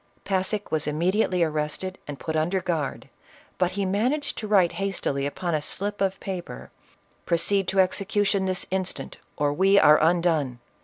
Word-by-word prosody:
Passick 195 +2 0
was 155 -2 0
immediately 180 +4 +1
arrested 155 +4 -2
and 145 -1 -6
put 160 - -4
under 170 +5 +1
guard, 165 -6 -3 0.5
but 180 0 +1
he 200 0 -1
managed 240 +10 0
to 215 - -5
write 190 -5 +4
hastily 145 -8 -1
upon 170 +4 -3
a 155 - +1
slip 205 +7 -3
of 195 -1 0
paper, 185 -3 -6 0.6
"Proceed 185 +3 +1
to 195 - +1
execution 195 +1 +1
this 185 -1 -1
instant 185 -1 -3 0.2
or 145 -1 +1
we 195 +5 +4
are 150 -5 +6
undone 160 -6 +2
185 Hz, 155 wpm, -25 LUFS, 160-195 Hz, 0.6 s, are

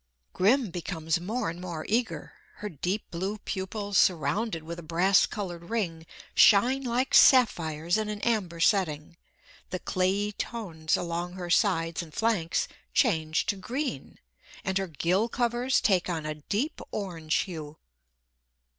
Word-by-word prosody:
Grim 220 +2 +3
becomes 165 -2 -2
more 215 +6 -2
and 170 +2 -5
more 170 -4 -5
eager. 230 +2 -1 0.2
Her 210 - -6
deep 180 +6 -2
blue 190 +5 -3
pupils, 200 0 -2
surrounded 185 +1 +1
with 170 +2 -7
a - - -6
brass 175 +4 +3
coloured 175 -5 -6
ring, 170 -8 -2 0.3
shine 245 +7 +5
like 250 +1 -1
sapphires 170 - +5
in 215 -1 -2
an 210 -1 -4
amber 195 -8 0
setting; 165 -4 +1 0.5
the 185 - -2
clayey 190 +3 0
tones 180 -8 -2
along 175 +1 -3
her 180 -2 -5
sides 165 +1 +2
and 160 -3 -11
flanks 215 -8 +1 0.3
change 160 0 +2
to - - 0
green, 235 - -4 0.5
and 190 0 0
her 195 - -2
gill 180 - 0
covers 245 +1 +1
take 185 -3 +2
on 160 -3 -2
a 155 - -2
deep 205 - -3
orange 165 -6 -3
hue. 155 -5 -8
185 Hz, 140 wpm, -28 LUFS, 165-215 Hz, 0.5 s, shine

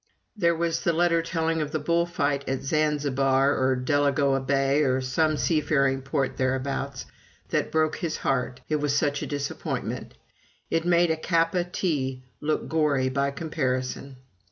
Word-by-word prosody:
There 170 -5 +2
was 165 0 0
the 170 - +2
letter 170 0 +3
telling 165 -1 -1
of 150 - -2
the 155 - 0
bull 170 +3 +1
fight 140 -5 -1
at 135 0 -2
Zanzibar, 140 -2 +2
or 130 0 +2
Delagoa 140 +1 +2
Bay, 135 +2 +2
or 130 -3 +2
some 150 +4 +1
seafaring 140 -4 +1
port 135 0 -2
thereabouts, 130 -1 -2 0.4
that - - 0
broke 155 -1 +1
his 170 -3 -3
heart, 125 -1 -1
it 155 - +1
was 145 -1 0
such 145 -1 0
a - - -3
disappointment 145 -1 -4 0.6
"it 165 0 +1
made 175 -1 +4
a 160 - 0
Kappa 165 +2 +1
tea 135 -8 -2 0.2
look 155 +1 -1
gory 145 -5 +1
by 140 +1 0
comparison." 135 -3 -3
145 Hz, 155 wpm, -26 LUFS, 135-160 Hz, 0.6 s, made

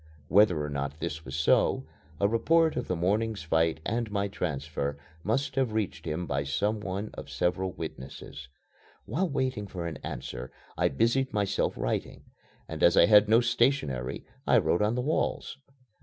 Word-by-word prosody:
Whether 90 -6 +5
or - - -4
not 70 +1 -3
this 80 -2 -4
was 65 - -6
so, 75 - +3 0.3
a 100 - +4
report 160 +9 +3
of - - -3
the 90 - 0
morning's 100 +3 0
fight 80 0 +1
and 115 0 -1
my 100 -1 0
transfer 70 -5 -3 0.3
must 135 +6 0
have 130 -5 +1
reached 110 -3 -2
him 80 +2 -2
by 70 -2 -1
some 100 +10 0
one 100 +1 -4
of - - -8
several 90 +1 -1
witnesses. 70 -7 -8 0.6
While 170 - -1
waiting 130 -7 -1
for 90 -3 -5
an 85 - -4
answer, 60 +1 -6 0.2
I - - +2
busied 120 - +1
myself 100 -2 0
writing, - - -3 0.4
and - - -6
as - - +5
I - - +8
had 105 +1 +6
no 115 +2 +6
stationery 120 - 0 0.2
I - - +6
wrote 85 - +2
on 105 +3 +2
the 125 - 0
walls. 145 +1 -1
100 Hz, 170 wpm, -28 LUFS, 80-115 Hz, 0.6 s, I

